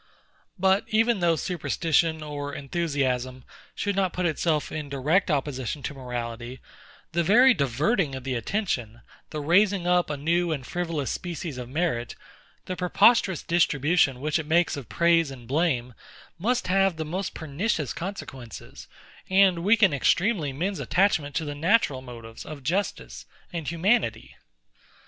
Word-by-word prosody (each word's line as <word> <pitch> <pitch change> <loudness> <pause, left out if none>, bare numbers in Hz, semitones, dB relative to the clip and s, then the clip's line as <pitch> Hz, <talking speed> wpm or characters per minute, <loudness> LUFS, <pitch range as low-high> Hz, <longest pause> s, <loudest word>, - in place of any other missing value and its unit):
But 190 +1 +2
even 225 0 +2
though 170 -2 +3
superstition 160 0 0
or 145 -1 -5
enthusiasm 135 -4 -2 0.3
should 200 -1 -1
not 190 -3 +1
put 180 - -1
itself 155 -1 0
in 150 -2 -5
direct 150 +8 +1
opposition 140 -2 -2
to - - -4
morality; 120 -1 -6 0.5
the 170 - +1
very 245 +9 +6
diverting 145 - 0
of 130 - -7
the 135 0 -2
attention, 120 - -2 0.3
the 150 - -4
raising 185 +4 +3
up 180 -1 +2
a 150 - -3
new 170 +4 +1
and 140 -5 -3
frivolous 165 -5 -3
species 170 -6 -5
of 125 -1 -7
merit, 135 -5 -2 0.5
the 185 - -4
preposterous 190 +1 +3
distribution 155 -4 +2
which 150 +2 0
it 155 - -5
makes 170 +2 +2
of 135 -9 -8
praise 165 - +3
and 125 -4 -11
blame, 130 -4 0 0.5
must 245 +7 0
have 195 -1 +2
the 160 - -3
most 185 +5 -4
pernicious 160 - -2
consequences, 165 - -8 0.4
and 190 -3 +4
weaken 205 -3 +4
extremely 170 - +1
men's 180 +7 -3
attachment 145 +1 +1
to 160 - -1
the 145 - -4
natural 155 - +2
motives 115 -3 -10
of 145 -3 -9
justice 185 +8 -3 0.3
and 165 -4 -4
humanity. 170 - 0
160 Hz, 145 wpm, -26 LUFS, 135-180 Hz, 0.5 s, very